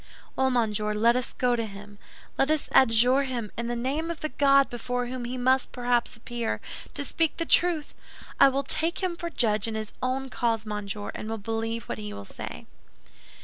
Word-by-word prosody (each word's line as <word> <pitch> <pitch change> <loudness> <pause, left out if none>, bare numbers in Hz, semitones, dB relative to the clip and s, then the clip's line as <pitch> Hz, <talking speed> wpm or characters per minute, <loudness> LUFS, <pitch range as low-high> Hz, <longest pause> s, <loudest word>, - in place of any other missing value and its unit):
"Well, 265 0 +2
monsieur, 215 -4 +1
let 230 +3 +4
us 250 -1 -1
go 250 -1 +2
to 230 - -1
him. 205 0 -11 0.4
Let 270 - +2
us 310 -1 +1
adjure 250 +2 +5
him, 245 -6 -3
in 235 0 -3
the 240 - -1
name 275 +7 -1
of 335 -1 -5
the 310 - -2
God 275 -1 +4
before 245 +1 -3
whom 245 0 -5
he 250 +2 -4
must 260 +1 +2
perhaps 245 -1 0
appear, 235 0 -3 0.4
to - - -1
speak 325 +1 0
the 330 - -1
truth. 330 -3 +2 0.5
I - - +8
will 275 +1 -1
take 320 +6 -1
him 360 -2 0
for 340 0 -4
judge 215 -8 +1
in 225 - -3
his 215 -1 -5
own 260 +1 -1
cause, 225 -2 0
monsieur, 210 -1 -4
and 215 - -6
will 225 - -2
believe 225 +2 -3
what 115 - -5
he 105 -1 -6
will 100 0 -8
say." - - -8
245 Hz, 200 wpm, -27 LUFS, 220-270 Hz, 0.5 s, I